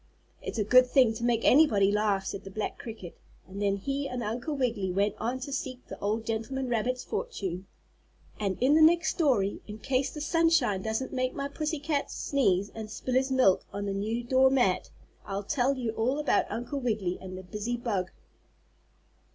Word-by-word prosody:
"It's -, -, -5 dB
a 215 Hz, -, +2 dB
good 250 Hz, +4 st, +6 dB
thing 250 Hz, -3 st, +4 dB
to 220 Hz, -, -6 dB
make 235 Hz, -1 st, +2 dB
anybody 220 Hz, -9 st, +5 dB
laugh," 205 Hz, -2 st, +1 dB
said 195 Hz, -, -5 dB
the 195 Hz, -, -8 dB
black 210 Hz, +2 st, -4 dB
cricket, 215 Hz, -7 st, -8 dB, 0.3 s
and 195 Hz, +2 st, -7 dB
then 200 Hz, -1 st, +1 dB
he 275 Hz, +7 st, -2 dB
and 250 Hz, -1 st, -4 dB
Uncle 240 Hz, +8 st, -3 dB
Wiggily 230 Hz, -8 st, -1 dB
went 200 Hz, +2 st, +1 dB
on 245 Hz, +3 st, -2 dB
to 280 Hz, +1 st, -5 dB
seek 255 Hz, -2 st, -5 dB
the -, -, -9 dB
old 215 Hz, +2 st, -1 dB
gentleman 245 Hz, +4 st, -2 dB
rabbit's 245 Hz, +2 st, -1 dB
fortune. 190 Hz, -, -4 dB, 0.7 s
And 200 Hz, -3 st, -1 dB
in 260 Hz, +4 st, +4 dB
the 315 Hz, -, +5 dB
next 335 Hz, +2 st, +5 dB
story, 240 Hz, -, +1 dB
in 210 Hz, 0 st, -7 dB
case 260 Hz, +4 st, 0 dB
the 300 Hz, -, -7 dB
sunshine 320 Hz, -, +2 dB
doesn't 220 Hz, +6 st, -3 dB
make 255 Hz, -1 st, -1 dB
my 280 Hz, 0 st, -2 dB
pussy 305 Hz, +2 st, -3 dB
cat 290 Hz, 0 st, -1 dB
sneeze 200 Hz, -8 st, 0 dB
and 220 Hz, -1 st, -7 dB
spill 250 Hz, +4 st, -4 dB
his 260 Hz, +1 st, +2 dB
milk, 255 Hz, -8 st, +4 dB
on 200 Hz, +1 st, -4 dB
the 200 Hz, -, -2 dB
new 220 Hz, +4 st, -2 dB
door 260 Hz, +2 st, +4 dB
mat, 245 Hz, -9 st, +2 dB, 0.3 s
I'll 200 Hz, 0 st, -4 dB
tell 270 Hz, +4 st, +1 dB
you 240 Hz, -3 st, -2 dB
all 235 Hz, +5 st, 0 dB
about 300 Hz, -1 st, +1 dB
Uncle 245 Hz, +5 st, -4 dB
Wiggily 215 Hz, -8 st, -1 dB
and 185 Hz, -1 st, -7 dB
the 185 Hz, -, -8 dB
busy 210 Hz, +6 st, -3 dB
bug. 205 Hz, -7 st, -2 dB
235 Hz, 190 wpm, -28 LUFS, 200-265 Hz, 0.7 s, good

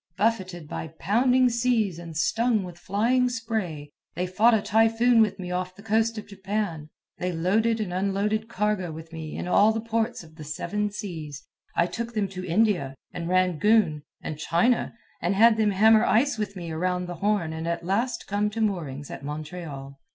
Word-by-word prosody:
Buffeted 185 Hz, -6 st, -1 dB
by 160 Hz, -, -5 dB
pounding 250 Hz, +6 st, +3 dB
seas 235 Hz, -7 st, +1 dB
and 165 Hz, -2 st, -8 dB
stung 225 Hz, +4 st, +2 dB
with 175 Hz, -1 st, -9 dB
flying 235 Hz, +7 st, +1 dB
spray, 215 Hz, -11 st, -4 dB, 0.2 s
they 180 Hz, +2 st, -1 dB
fought 215 Hz, +6 st, +4 dB
a 215 Hz, -, +1 dB
typhoon 225 Hz, +2 st, +4 dB
with 215 Hz, -2 st, +2 dB
me 180 Hz, -1 st, -6 dB
off 180 Hz, 0 st, -3 dB
the 200 Hz, -, -14 dB
coast 225 Hz, +1 st, +1 dB
of 215 Hz, -, -6 dB
Japan. 195 Hz, -6 st, -4 dB, 0.3 s
They 180 Hz, 0 st, -1 dB
loaded 215 Hz, +7 st, +1 dB
and 200 Hz, -5 st, -3 dB
unloaded 200 Hz, +4 st, 0 dB
cargo 210 Hz, -4 st, -1 dB
with 160 Hz, +1 st, -10 dB
me 160 Hz, -1 st, -6 dB
in -, -, -4 dB
all 205 Hz, +4 st, +5 dB
the 220 Hz, -, -2 dB
ports 230 Hz, -1 st, -2 dB
of 160 Hz, -1 st, -17 dB
the 155 Hz, -, -8 dB
Seven 175 Hz, +7 st, -2 dB
Seas. 160 Hz, -9 st, -7 dB, 0.3 s
I 170 Hz, -, +3 dB
took 235 Hz, +5 st, -5 dB
them 205 Hz, -2 st, +1 dB
to 185 Hz, -1 st, -7 dB
India, 180 Hz, -6 st, +1 dB, 0.2 s
and 170 Hz, -1 st, -4 dB
Rangoon, 185 Hz, -1 st, +3 dB, 0.2 s
and 155 Hz, -, -5 dB
China, 180 Hz, +11 st, +1 dB, 0.3 s
and 175 Hz, +4 st, 0 dB
had 225 Hz, +2 st, +6 dB
them 215 Hz, -1 st, +3 dB
hammer 220 Hz, +3 st, +5 dB
ice 250 Hz, +5 st, +3 dB
with 210 Hz, -3 st, -4 dB
me 170 Hz, -3 st, -6 dB
around 180 Hz, +2 st, -1 dB
the 175 Hz, -1 st, -6 dB
Horn 200 Hz, -6 st, +1 dB
and 160 Hz, +1 st, -4 dB
at 170 Hz, 0 st, -2 dB
last 225 Hz, +7 st, -1 dB
come 205 Hz, +1 st, 0 dB
to 220 Hz, +2 st, -6 dB
moorings 155 Hz, -10 st, -2 dB
at -, -, -8 dB
Montreal. 150 Hz, -2 st, -7 dB
195 Hz, 185 wpm, -26 LUFS, 170-220 Hz, 0.3 s, had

